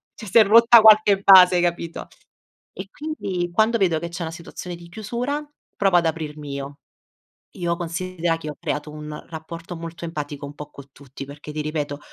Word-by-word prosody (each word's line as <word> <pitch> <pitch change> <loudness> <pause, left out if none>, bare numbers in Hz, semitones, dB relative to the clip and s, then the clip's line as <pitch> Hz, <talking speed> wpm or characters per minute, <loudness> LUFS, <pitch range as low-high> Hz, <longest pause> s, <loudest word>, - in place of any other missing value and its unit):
cioè 215 - -10
si 195 - +2
è - - +8
rotta 230 +3 +7
qualche 215 -2 +6
base, 185 -2 +8
hai 175 - +2
capito. 170 -1 -3 0.7
E 190 - -8
quindi, 195 - -4
quando 220 +5 +2
vedo 175 -6 +1
che 170 +1 -6
c'è 170 0 -6
una 160 - -5
situazione 175 +1 -8
di 170 0 -14
chiusura, 240 +9 -4 0.3
provo 195 -3 +3
ad 170 - +2
aprirmi 150 -2 -5
io. 140 +1 -7 0.8
Io 170 -1 -1
considera 175 -1 -3
che 155 -2 -8
ho 150 - -10
creato 150 +1 -4
un 150 0 -9
rapporto 165 +2 -8
molto 165 +1 -7
empatico 145 -3 -6
un 145 - -10
po' 150 0 -10
con 140 -1 -13
tutti, 140 0 -11
perché 145 +2 -10
ti 155 - -4
ripeto, 150 -1 -3
170 Hz, 190 wpm, -22 LUFS, 150-190 Hz, 0.8 s, è